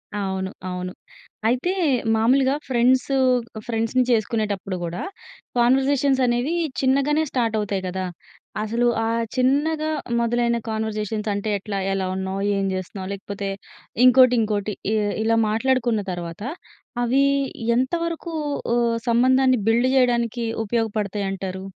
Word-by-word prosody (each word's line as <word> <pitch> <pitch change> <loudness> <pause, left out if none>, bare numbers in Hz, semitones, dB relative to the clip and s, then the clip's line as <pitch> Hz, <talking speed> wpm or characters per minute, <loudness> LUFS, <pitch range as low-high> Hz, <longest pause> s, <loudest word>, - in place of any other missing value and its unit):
అవును. 190 -2 -2 0.2
అవును. 180 0 -4 0.6
అయితే 255 +10 +1 0.4
మామూలుగా 260 +5 +3
ఫ్రెండ్సు 255 +2 +2 0.5
ఫ్రెండ్స్‌ని 230 +2 +1
చేసుకునేటప్పుడు 210 -4 -1
కూడా, 170 +1 -4 0.6
కాన్వర్జేషన్స్ 265 +2 +3
అనేవి 245 +6 0 0.3
చిన్నగానే 280 +4 +2
స్టార్ట్ 230 -3 0
అవుతాయి 200 -2 -2
కదా? 185 +1 -3 0.6
అసలు 230 +3 0 0.2
ఆ - - 0 0.3
చిన్నగా 300 +5 +1 0.3
మొదలైన 235 0 +1
కాన్వర్జేషన్స్ 220 -1 -2
అంటే, 205 +2 -3
ఎట్లా, 200 -1 -4
ఎలా 190 -1 -1
ఉన్నావ్, 190 +1 -3 0.2
ఏం 195 - 0
చేస్తున్నావ్, 185 +1 -6
లేకపోతే 200 0 -5 0.6
ఇంకోటి, 255 0 +7
ఇంకోటి 210 -1 -1 0.2
ఇ - - +2 0.3
ఇలా 225 0 +2
మాట్లాడుకున్న 235 -1 +1
తర్వాత, 170 0 -6 0.6
అవి 265 +4 +3 0.5
ఎంతవరకు 335 +5 -2 0.4
హ్మ్, 240 - +3
ఆ - - 0
సంబంధాన్ని 255 +1 +4
బిల్డ్ 235 +3 +3
చేయడానికి 240 -2 +2 0.2
ఉపయోగపడతాయి 210 -2 -1
అంటారు? 190 0 -5
230 Hz, 115 wpm, -23 LUFS, 200-255 Hz, 0.6 s, ఇంకోటి